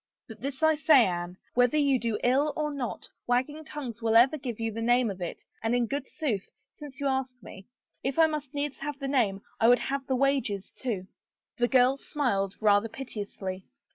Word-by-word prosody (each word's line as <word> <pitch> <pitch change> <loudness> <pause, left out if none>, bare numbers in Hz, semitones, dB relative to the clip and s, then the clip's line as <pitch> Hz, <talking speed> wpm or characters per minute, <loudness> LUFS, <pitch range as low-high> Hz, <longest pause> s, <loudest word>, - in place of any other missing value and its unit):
But 225 -3 -11
this 275 +3 -4
I 315 0 +6
say, 300 -4 +6
Anne, 175 0 -3 0.2
whether 245 +4 +3
you 280 -3 +3
do 230 -3 -1
ill 275 +4 +3
or 300 -1 -1
not, 255 -5 -4 0.2
wagging 260 +6 0
tongues 270 -7 -7
will 225 0 +1
ever 250 +6 +6
give 255 -6 -5
you 225 0 -1
the 225 +2 -5
name 240 -1 +3
of 190 -1 -9
it, 175 - -5 0.2
and 225 +2 +1
in 245 -1 +2
good 275 +3 -3
sooth, 225 -11 -3 0.2
since 290 -2 -10
you 285 - -3
ask 265 -2 0
me, 190 0 -11 0.3
if 270 0 -2
I 325 - +7
must 300 -2 -4
needs 285 -1 -2
have 290 0 -4
the 275 -1 -4
name 220 -8 +1 0.2
I 225 - +5
would 245 +1 +7
have 275 0 -3
the 265 - +1
wages, 250 -7 0
too." 215 -8 -4 0.5
The 240 -1 +2
girl 255 +1 +4
smiled, 200 -10 -1
rather 210 +1 +3
piteously. 200 -6 -6
250 Hz, 200 wpm, -28 LUFS, 225-280 Hz, 0.5 s, I